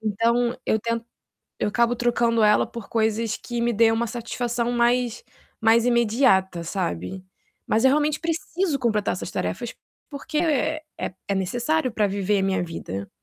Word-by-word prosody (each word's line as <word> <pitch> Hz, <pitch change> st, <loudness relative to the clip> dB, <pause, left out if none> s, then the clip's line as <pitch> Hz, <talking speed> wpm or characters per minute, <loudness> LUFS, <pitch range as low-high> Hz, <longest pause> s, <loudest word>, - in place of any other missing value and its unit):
Então 235 Hz, +3 st, +1 dB
eu 220 Hz, -, +2 dB
tento 230 Hz, +1 st, -2 dB, 0.6 s
eu -, -, +1 dB
acabo 235 Hz, +3 st, +2 dB
trocando 235 Hz, -1 st, +1 dB
ela 210 Hz, 0 st, +5 dB
por 235 Hz, -3 st, -9 dB
coisas 220 Hz, -1 st, 0 dB
que 240 Hz, -1 st, -4 dB
me 235 Hz, 0 st, +1 dB
deem 225 Hz, +1 st, +4 dB
uma 230 Hz, +1 st, 0 dB
satisfação 240 Hz, 0 st, -2 dB
mais 240 Hz, 0 st, +1 dB, 0.4 s
mais 225 Hz, +1 st, +4 dB
imediata, 225 Hz, -7 st, +3 dB
sabe. 170 Hz, -, -3 dB, 0.5 s
Mas 225 Hz, +3 st, +2 dB
eu 265 Hz, -, +7 dB
realmente 300 Hz, +1 st, +1 dB
preciso 330 Hz, -1 st, -1 dB
completar 215 Hz, -4 st, +1 dB
essas -, -, -4 dB
tarefas -, -, -3 dB, 0.4 s
porque, 300 Hz, +2 st, -5 dB
é 310 Hz, -1 st, +1 dB, 0.5 s
é 200 Hz, -, 0 dB
necessário 245 Hz, -, 0 dB
para 215 Hz, -2 st, +1 dB
viver 200 Hz, +1 st, 0 dB
a -, -, 0 dB
minha 190 Hz, -2 st, +1 dB
vida. 100 Hz, -, -6 dB
235 Hz, 155 wpm, -24 LUFS, 210-245 Hz, 0.6 s, eu